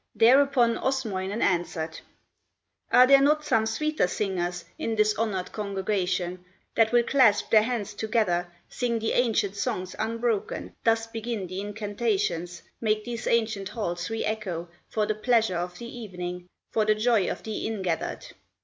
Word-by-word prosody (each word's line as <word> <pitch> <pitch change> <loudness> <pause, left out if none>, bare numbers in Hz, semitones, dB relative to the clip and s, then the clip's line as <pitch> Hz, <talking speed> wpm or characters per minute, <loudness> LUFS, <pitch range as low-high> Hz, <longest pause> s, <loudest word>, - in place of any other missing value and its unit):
Thereupon 245 -1 +4
Osmoinen 215 -6 -1
answered: 165 -3 -1 0.9
"Are 250 - +8
there 275 +1 +7
not 300 +2 +3
some 225 -7 +2
sweeter 305 +1 0
singers 180 -2 -2
In 225 - -1
this 215 0 +3
honored 205 -5 -2
congregation, 190 -3 -2 0.3
That 225 -1 +3
will 240 0 +4
clasp 235 -5 +3
their 220 - +7
hands 225 -3 -2
together, 205 -5 0 0.2
Sing 240 -2 -1
the 225 0 -1
ancient 220 -5 +1
songs 185 -2 -3
unbroken, 230 -1 -2
Thus 225 0 +3
begin 225 -2 -4
the 185 +2 -5
incantations, 205 -4 -2 0.2
Make 215 -1 +1
these 235 -1 -5
ancient 220 -4 +1
halls 175 -5 -3
re 225 0 -2
echo 185 -6 -3 0.2
For 215 -1 0
the 215 - 0
pleasure 220 -3 +2
of 175 +1 -4
the 235 0 -8
evening, 180 -5 -6 0.2
For 220 - +2
the 215 0 +3
joy 215 -2 +2
of - - -5
the 220 -1 -3
in 220 -3 -3
gathered?" 170 -3 -2
215 Hz, 150 wpm, -27 LUFS, 185-230 Hz, 0.9 s, Are